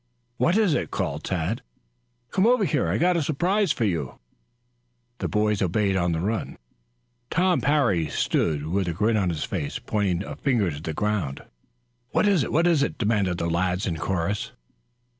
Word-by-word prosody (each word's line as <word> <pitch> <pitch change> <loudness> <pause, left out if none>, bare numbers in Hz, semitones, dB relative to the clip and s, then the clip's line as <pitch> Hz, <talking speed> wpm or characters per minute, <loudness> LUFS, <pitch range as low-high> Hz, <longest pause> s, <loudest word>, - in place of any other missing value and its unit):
"What 175 +5 +3
is 210 -7 +3
it?" - - -1
called 75 +3 -3
Tad. 90 +5 -2 0.7
"Come 195 +2 +3
over 245 -4 +4
here. 145 - +1
I've 100 +7 0
got 180 0 +3
a - - +1
surprise 175 +6 +1
for 120 - -1
you." 80 -9 -2 1.0
The - - -1
boys 105 -1 +1
obeyed 95 +2 +1
on 90 -2 +1
the 80 - -1
run. 110 +6 -2 0.7
Tom 180 +1 +2
Parry 135 - +2
stood 75 0 0
with 95 +3 -1
a 85 - -1
grin 105 +6 +1
on 95 -4 +1
his 80 -3 -2
face, 70 - -3
pointing 100 -4 -1
a - - -6
finger 115 - +1
to 75 0 -7
the 80 -1 -4
ground. 100 -10 -1 0.7
"What - - +2
is 190 -8 +3
it? - - -4
What 165 +3 +3
is 170 -5 +4
it?" 140 - -1
demanded 100 -5 +1
the 85 - -1
lads 90 +2 0
in 85 -4 -2
chorus. 95 +4 -2
100 Hz, 180 wpm, -25 LUFS, -, 1.0 s, over